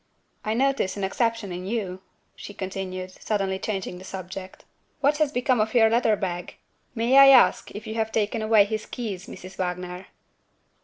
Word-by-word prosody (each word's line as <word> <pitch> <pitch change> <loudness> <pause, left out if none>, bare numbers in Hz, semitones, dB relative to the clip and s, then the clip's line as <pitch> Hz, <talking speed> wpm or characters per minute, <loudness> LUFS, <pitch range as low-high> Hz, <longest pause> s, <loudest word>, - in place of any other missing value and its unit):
"I 215 +1 -1
notice 265 -6 +1
an 200 - -3
exception 230 0 -1
in 180 +1 -5
You," 195 -4 -3 0.3
she 205 - -10
continued, 185 -1 -5
suddenly 195 -1 -2
changing 190 -3 -4
the - - -11
subject. 190 0 -8 0.3
"What 285 +1 +2
has 305 -2 +2
become 250 -3 +1
of 220 +2 -2
your 225 -2 +5
leather 230 -2 +3
bag? 180 -3 -4 0.4
May 240 +4 +4
I 275 - +10
ask 270 -2 +6
if 210 +1 -7
you 220 - -5
have 220 0 -1
taken 220 +1 0
away 215 -2 +5
his 215 +1 -4
keys, 205 -7 -5
Mrs. 185 +1 -11
Wagner?" 180 0 -4
205 Hz, 170 wpm, -25 LUFS, 185-230 Hz, 0.4 s, I